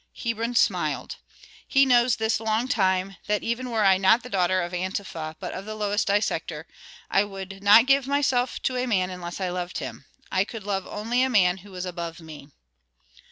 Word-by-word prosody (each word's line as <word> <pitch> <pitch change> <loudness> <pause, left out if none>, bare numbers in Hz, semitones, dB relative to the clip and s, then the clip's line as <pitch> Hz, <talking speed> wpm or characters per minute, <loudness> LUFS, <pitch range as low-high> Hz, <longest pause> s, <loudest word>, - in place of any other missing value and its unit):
Hebron 230 0 -2
smiled. - - 0 0.5
"He 275 0 +4
knows 245 -2 +4
this 220 0 0
long 220 +2 0
time 190 -6 0
that 210 -1 0
even 245 +2 -2
were 220 -3 +1
I 190 -1 +6
not 195 +5 +4
the 250 - -10
daughter 185 -1 +2
of 175 - -5
Antefa, 180 -3 -4
but - - -5
of 190 - -6
the 215 0 -6
lowest 205 0 -1
dissector, 205 +1 -1 0.5
I 195 - +4
would 195 -1 -8
not 210 +4 +7
give 275 0 +3
myself 265 -3 +1
to 255 - 0
a 250 +1 -1
man 185 -5 +1
unless 175 0 -7
I 185 -1 -1
loved 180 0 -4
him. - - -7 0.3
I 190 0 +2
could 215 +1 -8
love 195 -2 -2
only 230 +4 -1
a 260 - +2
man 185 -6 +3
who 190 0 -14
is 180 0 -4
above 170 -2 -5
me." 155 -3 -11
205 Hz, 195 wpm, -25 LUFS, 185-235 Hz, 0.5 s, not